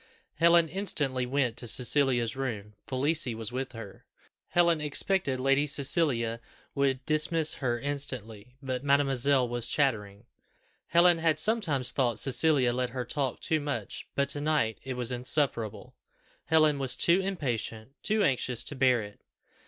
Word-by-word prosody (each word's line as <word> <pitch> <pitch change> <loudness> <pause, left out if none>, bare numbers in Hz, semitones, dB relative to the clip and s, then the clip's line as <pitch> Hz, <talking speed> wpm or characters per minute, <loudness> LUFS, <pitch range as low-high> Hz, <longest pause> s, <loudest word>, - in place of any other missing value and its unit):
Helen 170 +1 +4
instantly 145 -8 -1
went 125 -3 -1
to 120 - -5
Cecilia's 125 -1 +3
room; 110 -6 -5
Felicie 135 -2 +1
was 110 0 -4
with 130 0 -5
her. 115 -4 -11 0.4
Helen 170 -2 +2
expected 150 -1 +1
Lady 135 +2 +1
Cecilia 135 -5 0 0.3
would 135 -2 -1
dismiss 155 +1 +1
her 120 -3 -1
instantly; 125 -5 -4
but 130 -1 -4
mademoiselle 140 -2 +2
was 120 0 -3
chattering. 105 -6 -1 0.6
Helen 170 0 +4
had 160 -1 +1
sometimes 160 - +1
thought 120 -5 0
Cecilia 135 -1 +2
let 125 0 -2
her 125 0 -5
talk 135 0 -3
too 160 - 0
much, 145 -1 -5
but 140 0 +1
to 145 - -2
night 150 -8 0
it 130 -1 -5
was 125 0 0
insufferable. 125 -3 -2 0.5
Helen 155 -3 +3
was 130 -2 0
too 170 +7 +3
impatient, 130 - -4
too 215 0 +1
anxious 125 - 0
to 145 - -2
bear 130 -3 +2
it. 105 0 -13
135 Hz, 145 wpm, -28 LUFS, 120-150 Hz, 0.6 s, Helen